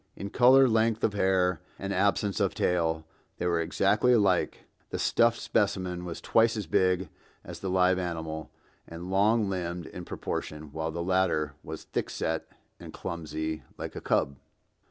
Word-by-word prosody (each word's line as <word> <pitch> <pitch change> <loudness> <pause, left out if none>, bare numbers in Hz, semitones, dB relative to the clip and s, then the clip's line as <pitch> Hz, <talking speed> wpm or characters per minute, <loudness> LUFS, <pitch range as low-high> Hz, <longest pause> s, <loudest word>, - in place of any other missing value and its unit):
In 100 +1 -6
color, 130 +2 +6
length 110 -1 +2
of 105 - +2
hair, 95 -3 +2 0.2
and 100 0 -3
absence 100 +1 +1
of - - +1
tail 80 -3 0 0.3
they - - -3
were 85 -1 +2
exactly 100 +8 +2
alike. 100 -6 +2 0.2
The - - -3
stuffed 115 0 +3
specimen 95 -4 -1
was 85 -2 -5
twice 115 0 +3
as 105 - -3
big 90 +1 +1 0.3
as - - -8
the 95 - -3
live 90 0 +3
animal 80 -3 -4 0.4
and 85 +3 -7
long 105 +3 +3
limbed 90 -2 -3
in 90 - -8
proportion, 75 -3 -5
while 80 +1 -3
the 85 +1 -3
latter 90 -5 +1
was - - -7
thick - - -3
set 80 -1 -2 0.3
and - - -9
clumsy 80 -1 -4 0.2
like - - -6
a - - -5
cub. 70 0 0
90 Hz, 160 wpm, -28 LUFS, 85-100 Hz, 0.4 s, color